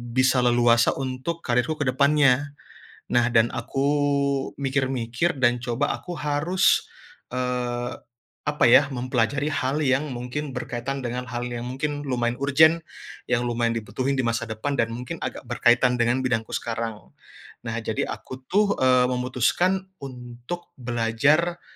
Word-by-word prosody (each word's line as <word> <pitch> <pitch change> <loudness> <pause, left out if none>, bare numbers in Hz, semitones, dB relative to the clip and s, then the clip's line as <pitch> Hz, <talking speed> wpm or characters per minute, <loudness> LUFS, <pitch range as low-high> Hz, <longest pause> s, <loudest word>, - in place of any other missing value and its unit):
bisa 130 0 +4
leluasa 120 -1 +4
untuk 135 +6 -4
karirku 125 +5 +1
ke 155 - -2
depannya. 140 0 +3 0.6
Nah, 120 0 +3
dan 115 -1 +3
aku 135 0 -2 0.7
mikir-mikir 135 +2 -1
dan 120 -2 +2
coba 120 0 -1
aku 175 -1 -7
harus, 160 +6 +1 0.4
eee, 125 -1 -2 0.4
apa, 150 0 +1
ya, 135 +4 +6
mempelajari 130 +3 -1
hal 145 +1 0
yang 135 +3 +1
mungkin 125 +4 -4
berkaitan 130 +1 -4
dengan 125 +1 -4
hal 120 0 -3
yang 120 -1 -4
mungkin 145 +4 -3
lumayan 120 -4 -1
urgent, 155 +4 +5 0.5
yang 125 0 +1
lumayan 120 -1 0
dibutuhin 125 +6 -2
di 130 - 0
masa 115 0 -1
depan 110 +6 -3
dan 115 -4 +1
mungkin 120 +2 -6
agak - - -5
berkaitan 120 +1 +3
dengan 125 +2 +1
bidangku 115 -3 -1
sekarang. 115 -2 -4 0.5
Nah, 115 -1 -4
jadi 110 -2 -2
aku, 130 0 -7
tuh, 205 +2 +3
eee, 125 -1 +5
memutuskan 130 +10 +1 0.2
untuk 125 +6 -8
belajar 135 +7 +1
125 Hz, 135 wpm, -24 LUFS, 120-145 Hz, 0.7 s, ya